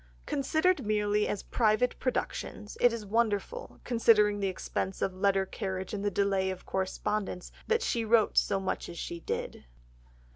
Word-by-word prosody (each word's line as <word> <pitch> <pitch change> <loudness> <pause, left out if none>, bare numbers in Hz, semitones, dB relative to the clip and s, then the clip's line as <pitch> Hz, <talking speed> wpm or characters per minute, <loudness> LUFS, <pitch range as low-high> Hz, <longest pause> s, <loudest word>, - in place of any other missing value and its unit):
Considered 315 +6 +1
merely 210 0 +1
as 205 - -3
private 230 +2 +1
productions, 230 -4 -3
it 245 - +6
is 230 -2 -5
wonderful, 230 - -1
considering 210 -3 +4
the 200 - 0
expense 190 0 -3
of 190 - 0
letter 195 0 +2
carriage 190 -1 -4
and 200 -1 -3
the 205 - +2
delay 195 -1 +1
of 185 -1 -6
correspondence, 190 0 -2 0.2
that 460 0 +2
she 235 - 0
wrote 225 0 +3
so 195 - +3
much 190 - -3
as 170 - -8
she 170 0 -5
did. - - -4
210 Hz, 155 wpm, -30 LUFS, 190-230 Hz, 0.2 s, it